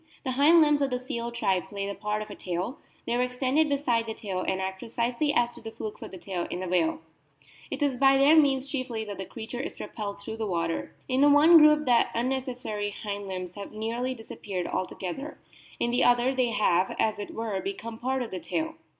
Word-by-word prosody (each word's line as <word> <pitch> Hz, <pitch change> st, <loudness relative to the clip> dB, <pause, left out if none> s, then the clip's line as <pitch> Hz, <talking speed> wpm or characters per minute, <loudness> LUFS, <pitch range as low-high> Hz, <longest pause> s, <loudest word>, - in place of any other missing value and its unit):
The 260 Hz, -, -1 dB
hind 295 Hz, +6 st, +6 dB
limbs 295 Hz, -1 st, +4 dB
of 275 Hz, -, +2 dB
the 250 Hz, -1 st, -1 dB
seal 235 Hz, -2 st, -4 dB
tribe 195 Hz, -6 st, 0 dB
play 200 Hz, -1 st, -4 dB
the 200 Hz, -, -3 dB
part 210 Hz, +1 st, -2 dB
of 210 Hz, -, -11 dB
a -, -, -7 dB
tail; 180 Hz, +8 st, -4 dB, 0.3 s
they -, -, -1 dB
are 245 Hz, -, +2 dB
extended 260 Hz, +5 st, +1 dB
beside 245 Hz, -5 st, +1 dB
the 220 Hz, -, -4 dB
tail 190 Hz, -3 st, -4 dB
and 190 Hz, 0 st, -1 dB
act 190 Hz, 0 st, -3 dB
precisely 240 Hz, +5 st, -1 dB
as 240 Hz, -3 st, +2 dB
do -, -, -13 dB
the 225 Hz, -, -6 dB
flukes 215 Hz, -1 st, -7 dB
of -, -, -7 dB
the 190 Hz, -, -9 dB
tail 180 Hz, -1 st, -4 dB
in 180 Hz, -, -4 dB
the 185 Hz, -, -4 dB
whale; 170 Hz, -3 st, +1 dB, 0.7 s
it 290 Hz, -, -2 dB
is 275 Hz, -3 st, +1 dB
by 270 Hz, +1 st, +5 dB
their 280 Hz, +4 st, +6 dB
means 280 Hz, -3 st, +4 dB
chiefly 255 Hz, -5 st, -3 dB
that 205 Hz, -2 st, -7 dB
the 190 Hz, -, -4 dB
creature 230 Hz, +3 st, -7 dB
is 270 Hz, -, -4 dB
propelled 205 Hz, -2 st, -6 dB
through 220 Hz, +2 st, -7 dB
the 220 Hz, -1 st, -2 dB
water. 170 Hz, -3 st, -2 dB
In 260 Hz, +1 st, +1 dB
the 290 Hz, -, +7 dB
one 310 Hz, +4 st, +8 dB
group 300 Hz, 0 st, +6 dB
the 240 Hz, -2 st, +4 dB
unnecessary 245 Hz, -4 st, -2 dB
hind 205 Hz, -1 st, -5 dB
limbs 185 Hz, -2 st, -5 dB
have 200 Hz, +1 st, -8 dB
nearly 235 Hz, +4 st, -2 dB
disappeared 200 Hz, -5 st, -5 dB
altogether; 185 Hz, -, -4 dB, 0.4 s
in 240 Hz, -, +1 dB
the 245 Hz, -, +2 dB
other 245 Hz, +2 st, +4 dB
they 255 Hz, -2 st, +1 dB
have, 190 Hz, -5 st, +2 dB
as 215 Hz, -1 st, +1 dB
it 205 Hz, -, -6 dB
were, 220 Hz, -4 st, -2 dB
become 225 Hz, +4 st, -5 dB
part 260 Hz, +1 st, -1 dB
of 235 Hz, -, -8 dB
the 185 Hz, -, -4 dB
tail. 320 Hz, -, -2 dB
235 Hz, 225 wpm, -27 LUFS, 200-265 Hz, 0.7 s, one